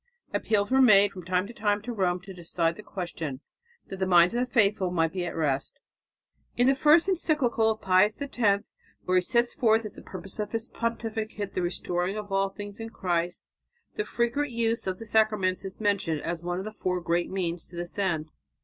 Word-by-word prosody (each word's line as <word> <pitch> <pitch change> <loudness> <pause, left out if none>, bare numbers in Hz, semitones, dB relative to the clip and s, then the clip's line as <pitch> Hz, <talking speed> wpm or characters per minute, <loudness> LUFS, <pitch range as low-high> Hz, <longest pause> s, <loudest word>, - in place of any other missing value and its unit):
Appeals 205 -1 +1
were 265 0 +5
made 205 -5 +7
from 185 -2 -9
time 185 +1 +1
to 230 - -10
time 205 -2 +1
to 240 +1 -4
Rome 180 -4 0
to 190 +1 -10
decide 170 -1 -1
the - - -10
question, 165 -9 -5 0.5
that 190 - -8
the 190 - 0
minds 175 +1 +6
of 240 - 0
the 250 0 -1
faithful 205 -5 +3
might 165 -2 +1
be 180 -2 -2
at 170 - -5
rest. 140 -4 -1 0.8
In 245 - +4
the 270 - +5
first 305 +5 +5
encyclical 295 - +2
of 220 0 -2
Pius 190 +3 +3
X 225 -8 0 0.3
where 185 0 +3
he - - +5
sets 235 +6 +1
forth 225 -3 +3
as 210 - -6
the - - -11
purpose 185 +2 -8
of 210 +1 -3
his 225 +1 -2
pontificate 220 -3 -3
the - - -1
restoring 175 +2 -1
of 210 -1 -6
all 195 0 +2
things 205 +1 -9
in 225 0 -5
Christ, 175 -4 -2 0.5
the 425 - -1
frequent 240 - -1
use 230 -3 -1
of 185 -1 -1
the 225 - -9
sacraments 215 -4 +2
is 190 0 -7
mentioned 200 -7 0
as 165 0 -3
one 175 0 -2
of 190 - -4
the 215 - -5
four 185 -4 -2
great 170 0 0
means 175 -3 -2
to 175 - -14
this 175 +3 -6
end. 160 -6 -1
200 Hz, 210 wpm, -27 LUFS, 180-225 Hz, 0.8 s, made